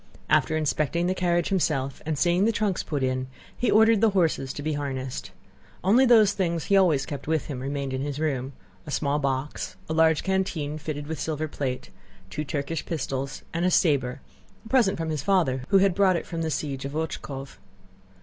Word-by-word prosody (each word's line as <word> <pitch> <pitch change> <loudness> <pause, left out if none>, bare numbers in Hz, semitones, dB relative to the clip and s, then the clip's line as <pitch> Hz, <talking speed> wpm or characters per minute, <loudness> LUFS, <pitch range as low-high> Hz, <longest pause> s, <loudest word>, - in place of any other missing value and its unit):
After 155 - +3
inspecting 155 +2 0
the 185 - +1
carriage 175 -2 +1
himself 145 -8 0
and 155 -2 -1
seeing 175 +5 +3
the 230 - +3
trunks 210 -4 0
put 145 -3 -3
in, 130 0 -1 0.3
he 245 - 0
ordered 220 0 +5
the 225 - +5
horses 160 -6 +1
to 145 - -6
be 155 0 -1
harnessed. 135 -3 -4 0.5
Only 235 +8 +5
those 220 -4 +6
things 170 -5 -1
he 200 - +3
always 170 -8 +4
kept 145 -1 -7
with 160 -2 0
him 135 -4 -5
remained 140 0 -3
in 130 - -2
his 145 0 -3
room; 140 -4 -1 0.3
a - - -6
small 145 0 0
box, 135 0 -2
a 160 - -2
large 160 -1 +3
canteen 180 -6 -1
fitted 150 -1 -5
with 160 +1 -5
silver 155 0 -2
plate, 130 -4 -4 0.4
two 150 - -3
Turkish 145 +1 -3
pistols 135 -4 -4
and 170 +1 -1
a 180 - +3
saber—a 140 - -1
present 235 -7 +3
from 165 -1 -2
his 150 -3 -2
father 135 -8 +1
who 195 - +5
had 195 -1 +4
brought 190 -1 +3
it 170 - -2
from 165 -1 -4
the 160 - -1
siege 140 -3 -3
of 140 +1 -5
Ochákov. 140 -3 -5
155 Hz, 195 wpm, -26 LUFS, 140-180 Hz, 0.5 s, those